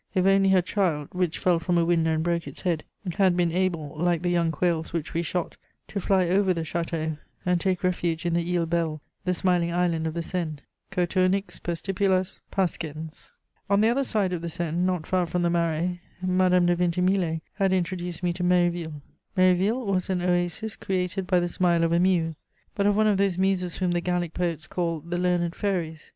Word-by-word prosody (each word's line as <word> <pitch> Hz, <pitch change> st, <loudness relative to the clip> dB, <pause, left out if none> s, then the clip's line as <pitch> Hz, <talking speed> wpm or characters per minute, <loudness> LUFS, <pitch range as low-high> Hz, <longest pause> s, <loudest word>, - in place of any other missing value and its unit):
If 185 Hz, -1 st, +3 dB
only 195 Hz, 0 st, +4 dB
her 185 Hz, -2 st, +4 dB
child, 170 Hz, -7 st, 0 dB
which 180 Hz, -3 st, -1 dB
fell 175 Hz, -2 st, +2 dB
from 175 Hz, +2 st, 0 dB
a 170 Hz, -, +3 dB
window 165 Hz, -2 st, +2 dB
and 160 Hz, -, -1 dB
broke 170 Hz, -2 st, -1 dB
its 140 Hz, -, -10 dB
head, 170 Hz, -4 st, 0 dB, 0.3 s
had 190 Hz, -3 st, +4 dB
been 175 Hz, -2 st, +2 dB
able, 170 Hz, -5 st, -1 dB
like 175 Hz, 0 st, +1 dB
the 175 Hz, -, +1 dB
young 170 Hz, -1 st, +2 dB
quails 160 Hz, 0 st, -1 dB
which 165 Hz, -3 st, -3 dB
we 165 Hz, -, +1 dB
shot, 175 Hz, 0 st, -3 dB, 0.3 s
to 200 Hz, -, -3 dB
fly 185 Hz, -1 st, +2 dB
over 190 Hz, +1 st, +2 dB
the 165 Hz, -, -2 dB
château 160 Hz, -1 st, -3 dB, 0.3 s
and 180 Hz, -1 st, +2 dB
take 185 Hz, 0 st, 0 dB
refuge 175 Hz, -2 st, 0 dB
in 170 Hz, -, +1 dB
the 170 Hz, +1 st, 0 dB
Île 170 Hz, -1 st, +1 dB
Belle, 165 Hz, -2 st, -1 dB, 0.3 s
the 180 Hz, -, +2 dB
smiling 175 Hz, -1 st, +1 dB
island 170 Hz, -2 st, +1 dB
of 160 Hz, -, -4 dB
the 170 Hz, -, -2 dB
Seine: 165 Hz, -4 st, -3 dB, 0.3 s
Coturnix 185 Hz, +1 st, 0 dB
per 175 Hz, -, -2 dB
stipulas 190 Hz, +1 st, 0 dB
pascens! 160 Hz, -4 st, -3 dB, 0.4 s
On 200 Hz, 0 st, +4 dB
the 220 Hz, +2 st, +4 dB
other 270 Hz, +4 st, +2 dB
side 205 Hz, -7 st, 0 dB
of 175 Hz, -, -3 dB
the 170 Hz, -, -4 dB
Seine, 170 Hz, -1 st, -3 dB
not 180 Hz, -4 st, -1 dB
far 180 Hz, -2 st, +1 dB
from 175 Hz, +2 st, -1 dB
the 170 Hz, -, +2 dB
Marais, 170 Hz, +1 st, 0 dB, 0.2 s
Madame 185 Hz, -1 st, +3 dB
de 175 Hz, 0 st, +3 dB
Vintimille 180 Hz, -1 st, +1 dB
had 195 Hz, -1 st, +1 dB
introduced 180 Hz, -1 st, -2 dB
me 175 Hz, -1 st, +1 dB
to 180 Hz, +1 st, -4 dB
Méréville. 175 Hz, -4 st, +1 dB, 0.4 s
Méréville 185 Hz, +7 st, +3 dB
was 190 Hz, -2 st, 0 dB
an 180 Hz, -2 st, 0 dB
oasis 180 Hz, +5 st, 0 dB
created 185 Hz, 0 st, -2 dB
by 180 Hz, -1 st, +3 dB
the 175 Hz, -, 0 dB
smile 175 Hz, -1 st, +2 dB
of 165 Hz, -, +2 dB
a 170 Hz, -, +3 dB
muse, 170 Hz, -4 st, +1 dB, 0.3 s
but 200 Hz, 0 st, +1 dB
of 205 Hz, 0 st, +3 dB
one 215 Hz, -, +4 dB
of 210 Hz, -2 st, +3 dB
those 195 Hz, -2 st, +1 dB
muses 185 Hz, -2 st, 0 dB
whom 180 Hz, -2 st, 0 dB
the 175 Hz, 0 st, 0 dB
Gallic 175 Hz, -1 st, -1 dB
poets 170 Hz, -3 st, -2 dB
call 170 Hz, -2 st, -2 dB
"the 175 Hz, +3 st, -3 dB
learned 175 Hz, -1 st, +1 dB
fairies." 170 Hz, -6 st, -3 dB
175 Hz, 205 wpm, -26 LUFS, 170-185 Hz, 0.4 s, only